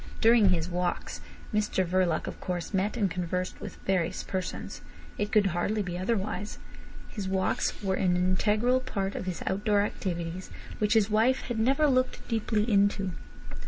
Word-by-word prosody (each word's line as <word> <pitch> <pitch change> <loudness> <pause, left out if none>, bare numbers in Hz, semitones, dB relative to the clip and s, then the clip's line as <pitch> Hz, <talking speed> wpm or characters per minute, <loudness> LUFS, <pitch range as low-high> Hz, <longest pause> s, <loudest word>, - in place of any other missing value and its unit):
During 225 -3 +6
his 170 -2 +1
"walks" 180 0 -2 0.3
Mr 210 -3 +1
Verloc, 180 -2 +1
of - - -6
course, 180 +1 -3
met 200 +5 0
and 205 -4 +2
conversed 180 +1 -3
with - - -7
various 185 -2 0
persons. 185 -1 -4 0.4
It 210 0 -1
could 210 -2 +4
hardly 205 +5 0
be 180 -2 -4
otherwise. 205 +2 -2 0.5
His 200 -4 -5
walks 190 +2 0
were 190 -1 +1
an 180 -1 +2
integral 210 +7 +2
part 195 -5 -3
of 185 - -5
his 180 -3 -3
outdoor 205 +1 +2
activities, 180 -3 -3 0.3
which 210 +2 +2
his 215 -1 +3
wife 230 +5 +3
had 240 -3 -4
never 270 +7 +3
looked 255 -3 +1
deeply 220 -2 0
into. 200 -3 +2
195 Hz, 160 wpm, -28 LUFS, 185-215 Hz, 0.5 s, During